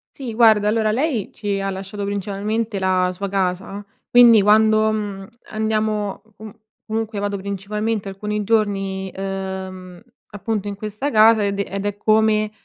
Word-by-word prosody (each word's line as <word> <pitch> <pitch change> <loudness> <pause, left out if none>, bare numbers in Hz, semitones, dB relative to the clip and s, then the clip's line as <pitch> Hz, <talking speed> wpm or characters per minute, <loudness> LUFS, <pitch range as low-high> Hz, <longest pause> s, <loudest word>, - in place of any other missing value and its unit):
Sì 255 -5 -6
guarda, 220 -2 +5
allora 215 0 +2
lei, 250 - -1
ci 200 -2 -3
ha 195 - -2
lasciato 195 +1 -6
principalmente 205 +2 -2
la 185 -1 +1
sua 200 +2 -5
casa. 195 +1 -2 0.2
Quindi, 240 -3 +7
quando, 215 +1 +4
mhmm, 205 -3 -4 0.2
andiamo, 215 -2 -1
comu 220 0 -10 0.3
comunque 220 -1 -3
vado 205 0 -2
principalmente 200 +2 -3
alcuni 210 +2 -3
giorni, 195 -3 -1
uhm, 190 -2 -6 0.3
appunto, 205 0 -3
in 200 - -4
questa 215 +7 -4
casa, 220 -1 +5
ed 200 0 -2
è 200 -1 -3
ed 200 0 -3
è 205 -1 -2
come, 215 0 +2
205 Hz, 145 wpm, -21 LUFS, 195-220 Hz, 0.3 s, Quindi